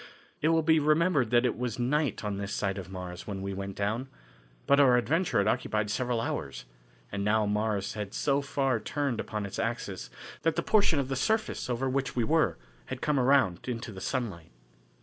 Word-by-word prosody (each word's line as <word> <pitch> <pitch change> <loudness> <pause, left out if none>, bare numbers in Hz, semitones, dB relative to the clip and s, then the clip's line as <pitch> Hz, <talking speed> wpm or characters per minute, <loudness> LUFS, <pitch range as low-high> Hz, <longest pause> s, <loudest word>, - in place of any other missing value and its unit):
It 155 - +2
will 165 0 +3
be 160 0 +5
remembered 155 -4 +3
that 120 +1 +4
it 125 - +1
was 125 0 -3
night 135 +1 0
on 105 -2 -2
this 100 0 -4
side 100 -1 -1
of 90 -2 -8
Mars 90 -1 -7
when 95 -2 -4
we 100 0 -3
went 100 0 -5
down, 110 +6 -1 0.6
but 140 - +4
our 130 -3 +6
adventure 160 +9 +1
had 100 0 +3
occupied 105 -1 0
several 125 +1 0
hours, 60 - -4 0.5
and 100 0 -2
now 105 +1 +3
Mars 105 -1 0
had 105 -2 -5
so 140 0 +1
far 135 -3 0
turned 140 0 -2
upon 105 -2 -3
its 100 - -6
axis 100 - -3 0.3
that 165 - +1
the - - 0
portion 205 -7 +3
of 135 -1 -1
its 135 0 0
surface 220 - 0
over 125 +2 0
which 135 +1 -1
we 120 - +2
were 135 - +2 0.3
had - - -5
come 150 -2 +1
around 125 -9 +3
into 120 -1 -4
the 95 -2 -9
sunlight. 100 - -3
120 Hz, 200 wpm, -29 LUFS, 100-140 Hz, 0.6 s, our